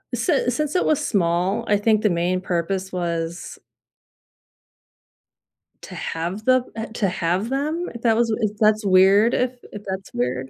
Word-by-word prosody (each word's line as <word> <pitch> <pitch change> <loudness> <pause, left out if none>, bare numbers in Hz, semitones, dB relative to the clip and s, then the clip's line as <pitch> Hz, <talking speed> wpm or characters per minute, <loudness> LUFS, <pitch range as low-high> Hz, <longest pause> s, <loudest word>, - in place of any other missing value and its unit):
Si 285 -8 +1
since 300 +5 -2
it 360 - +2
was 305 - +1
small, 185 +4 0
I 205 - +3
think 215 0 +2
the 215 - +2
main 175 +2 0
purpose 185 +2 -2
was 170 -1 -4 2.2
to - - -10
have 175 +6 -4
them 255 -1 +4
uh, 225 0 -4
to 220 -3 -2
have 180 +5 -1
them? 305 +6 -2
That 225 -2 +3
was 230 -2 +1 0.3
that's 215 0 +3
weird 195 +4 +5
if 250 0 0 0.2
if 205 - -8
that's 190 0 -6
weird? 125 +2 -2
200 Hz, 150 wpm, -22 LUFS, 175-230 Hz, 2.2 s, weird